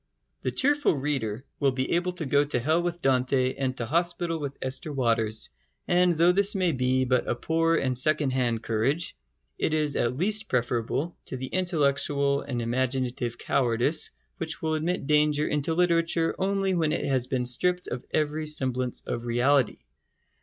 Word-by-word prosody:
The - - -1
cheerful 290 - +2
reader 130 -4 -2
will 140 -2 +2
be 130 0 -2
able 175 +1 0
to 175 -3 -3
go 140 +2 +3
to 145 -3 0
hell 155 +7 +2
with 175 0 -3
Dante 130 0 +2
and 130 -1 -3
to 120 - -2
hospital 170 +3 0
with 140 -2 -5
Esther 135 +4 -4
Waters; 115 -5 0 0.4
and 180 0 +4
though 170 +3 +5
this 200 +3 +2
may 185 -3 +2
be 130 -1 +1
but 125 -1 +1
a - - 0
poor 165 +5 +1
and 130 -5 0
secondhand 130 -4 +1
courage, 130 - -1 0.4
it 155 - +1
is 150 -2 0
at 120 +1 0
least 215 +6 +1
preferable 125 +6 -1
to 130 - -4
the 130 - -4
intellectual 140 -4 +1
and 120 -4 -4
imaginative 125 0 -1
cowardice 125 +3 +1 0.3
which 160 -2 -5
will 160 -1 -1
admit 160 +1 -1
danger 150 0 +2
into 150 +2 0
literature 170 -1 +2
only 195 0 +1
when 160 -4 +1
it - - -2
has 130 -2 +1
been 130 -1 -1
stripped 180 +9 0
of 125 - -5
every 155 0 -1
semblance 130 -4 -2
of 120 - -4
reality. 125 +1 +2
140 Hz, 165 wpm, -26 LUFS, 125-165 Hz, 0.4 s, though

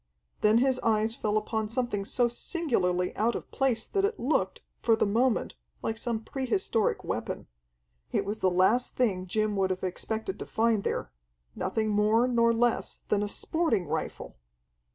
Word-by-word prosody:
Then 215 +1 +5
his 260 +1 +3
eyes 220 0 +2
fell 210 -2 0
upon 215 0 -2
something 230 -4 -1
so 245 +3 +2
singularly 230 - -1
out 230 +3 +1
of - - -6
place 250 -5 +1
that 395 - -1
it 415 +2 0
looked, 275 +6 0 0.2
for 230 - +3
the 220 - +1
moment, 235 +4 +1 0.3
like 225 - -1
some 225 -1 -3
pre 265 +1 -4
historic 235 - +1
weapon. - - -3 0.7
It - - 0
was 210 +2 -3
the 185 - +3
last 190 +7 +2
thing 190 -7 0
Jim 215 +2 0
would 190 -1 +2
have 185 0 -3
expected 220 - -3
to - - -5
find 225 -2 +1
there - - -2 0.4
nothing 215 +3 -1
more 215 +3 +3
nor 235 -2 +3
less 235 0 0
than 205 - +2
a 205 - 0
sporting 230 - 0
rifle! 155 - -4
220 Hz, 170 wpm, -28 LUFS, 205-245 Hz, 0.7 s, Then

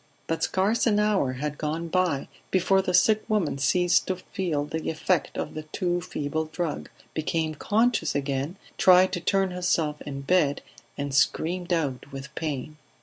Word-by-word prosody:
But 165 0 -2
scarce 205 +6 +1
an 210 -2 +3
hour 205 -11 +2
had 150 +3 -4
gone 160 +2 -2
by 175 -5 0 0.2
before 190 +1 +3
the 185 - -2
sick 210 +4 +4
woman 185 -10 0
ceased 175 +5 +3
to 185 - 0
feel 175 -5 -3
the 160 +2 -3
effect 165 +3 0
of - - -3
the 155 - -5
too 175 +3 -2
feeble 155 0 -3
drug, 155 -1 -4 0.2
became 155 0 -1
conscious 225 +9 +1
again, 140 +4 -2 0.2
tried 185 0 +6
to 180 - 0
turn 195 +2 +1
herself 165 -4 0
in 140 -1 -6
bed 145 -1 +2 0.3
and 140 -1 -3
screamed 175 +6 +1
out 140 -6 -1
with 135 +1 -8
pain. 150 -1 -4
165 Hz, 160 wpm, -26 LUFS, 150-185 Hz, 0.3 s, tried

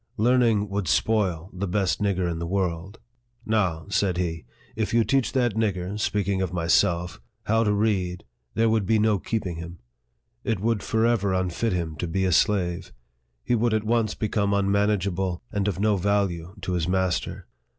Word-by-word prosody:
Learning 115 -2 +3
would 100 -2 -3
spoil 90 +2 +1
the 95 +2 -3
best 95 +1 0
nigger 95 -3 +1
in 85 -1 -3
the 85 - -3
world. 95 +1 -2 0.5
Now," 95 -8 0
said 95 -4 +1
he, 80 -5 -2
" - - -28
if 110 +1 -1
you 115 - +5
teach 135 +1 +1
that 120 -4 +2
nigger 100 -2 -1
(speaking 100 -2 0
of 95 -3 -1
myself) 85 -2 +1 0.2
how 115 +1 +2
to 105 - +2
read, 100 -4 0 0.3
there 115 +1 +3
would 110 -3 +1
be 110 - +3
no 105 -2 +2
keeping 95 -4 -3
him. 85 +1 -8 0.7
It 110 -4 -1
would 110 0 0
forever 110 -4 +1
unfit 95 +4 -1
him 85 -3 -2
to 90 - -3
be 95 +3 0
a 90 - +1
slave. 90 -1 +1 0.5
He - - 0
would 115 -1 +2
at 110 - 0
once 110 -1 +1
become 100 -2 0
unmanageable, 100 -2 0
and 100 -1 -1
of 95 -2 -1
no 105 0 +2
value 95 -2 -1
to 95 - -2
his 85 -2 0
master. 95 -1 -1
100 Hz, 175 wpm, -25 LUFS, 90-110 Hz, 0.7 s, you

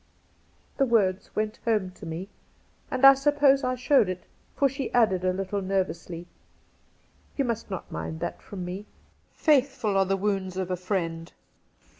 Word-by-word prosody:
The 275 - +4
words 200 -5 +2
went 215 +1 -1
home 210 -5 +1
to 175 - -11
me, 165 +4 -5 0.6
and 260 +1 +2
I 275 - +11
suppose 275 0 +3
I 255 0 0
showed 250 -4 +3
it, 185 -1 -4 0.3
for 280 - +3
she 270 0 -4
added 200 -7 +3
a 185 - +2
Httle 195 +1 -3
nervously: 185 -3 -2 0.6
' - - -35
You 275 - +1
must 230 -3 -3
not 190 -3 -6
mind 160 - -5
that 170 +1 -4
from 185 -3 -7
me. 190 +4 -6 0.3
" - - -39
Faithful 265 -8 +3
are 195 0 +4
the 195 +1 +1
wounds 190 -2 -1
of 185 -1 -2
a - - +1
friend." 170 -3 -3
195 Hz, 170 wpm, -27 LUFS, 185-250 Hz, 0.6 s, I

